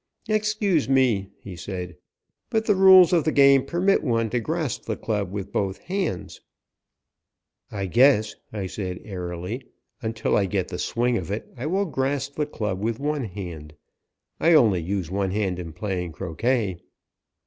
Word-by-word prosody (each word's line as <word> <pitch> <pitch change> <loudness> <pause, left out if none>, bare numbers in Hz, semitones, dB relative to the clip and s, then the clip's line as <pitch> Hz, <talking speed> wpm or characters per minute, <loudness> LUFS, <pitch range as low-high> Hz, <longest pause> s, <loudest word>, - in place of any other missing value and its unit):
"Excuse 210 -7 +1
me," 120 -8 +2
he 95 -3 -10
said, 90 -1 -6 0.5
"but 220 0 0
the 210 - +4
rules 190 -2 +7
of 170 -3 +4
the 155 - +1
game 140 -2 +6
permit 185 +3 +1
one 115 -5 0
to 125 - +1
grasp 155 0 -3
the 110 - -3
club 105 -4 -2
with 100 0 -5
both 95 -1 -1
hands." 180 - -4 1.3
"I 100 -2 -3
guess," 110 +1 +4 0.2
I 105 -3 -4
said 90 -1 -5
airily, 90 +4 -5 0.4
"until 110 -1 -1
I 100 -2 +2
get 95 -1 -1
the 90 - -5
swing 120 -1 0
of 90 - -7
it 105 +2 -5
I 125 +4 -4
will 195 +5 +1
grasp 140 -2 -2
the 150 0 -2
club 105 -9 -3
with 115 +1 -1
one 145 -2 -1
hand. 85 -7 -8 0.6
I 170 - +4
only 105 - +5
use 90 0 -3
one 95 0 0
hand 95 -2 -1
in 85 -2 -6
playing 90 -1 -4
croquet." 105 - -1
110 Hz, 160 wpm, -24 LUFS, 95-145 Hz, 1.3 s, rules